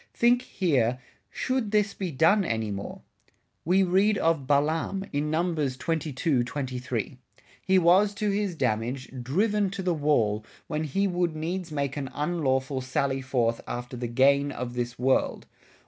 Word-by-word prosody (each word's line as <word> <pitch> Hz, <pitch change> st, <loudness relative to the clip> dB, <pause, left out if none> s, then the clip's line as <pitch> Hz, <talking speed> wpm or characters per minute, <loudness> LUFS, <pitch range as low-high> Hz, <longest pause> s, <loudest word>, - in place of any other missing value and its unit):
Think, 240 Hz, +1 st, +4 dB
here 135 Hz, -, +1 dB, 0.3 s
Should 255 Hz, -, -1 dB
this 210 Hz, -1 st, +1 dB
be 190 Hz, -3 st, -4 dB
done 165 Hz, +8 st, +3 dB
any 110 Hz, -, -2 dB
more? 100 Hz, 0 st, -6 dB, 0.6 s
We 185 Hz, +4 st, +3 dB
read 195 Hz, +3 st, +3 dB
of 160 Hz, -5 st, +1 dB
Balaam, 160 Hz, +7 st, +1 dB
in 145 Hz, +1 st, 0 dB
Num. 170 Hz, +2 st, 0 dB
22, 145 Hz, -1 st, 0 dB
23. 125 Hz, -2 st, -4 dB, 0.4 s
He 190 Hz, 0 st, +3 dB
was 190 Hz, +4 st, +4 dB
to 210 Hz, 0 st, 0 dB
his 200 Hz, -3 st, -1 dB
Damage, 125 Hz, +1 st, -2 dB
driven 200 Hz, -, +1 dB
to 195 Hz, 0 st, -5 dB
the 180 Hz, -1 st, +1 dB
Wall, 120 Hz, -9 st, +1 dB, 0.2 s
when 155 Hz, -1 st, -2 dB
he 195 Hz, +8 st, 0 dB
would 175 Hz, -3 st, 0 dB
needs 170 Hz, +2 st, -3 dB
make 140 Hz, -2 st, -2 dB
an 135 Hz, -2 st, -3 dB
unlawful 140 Hz, -4 st, 0 dB
Salley 135 Hz, +1 st, -1 dB
forth 120 Hz, -3 st, 0 dB
after 125 Hz, +1 st, -5 dB
the 120 Hz, 0 st, -3 dB
Gain 140 Hz, +4 st, +3 dB
of 120 Hz, -2 st, -5 dB
this 120 Hz, -1 st, -3 dB
World. 130 Hz, +2 st, +1 dB
150 Hz, 150 wpm, -27 LUFS, 130-185 Hz, 0.6 s, Think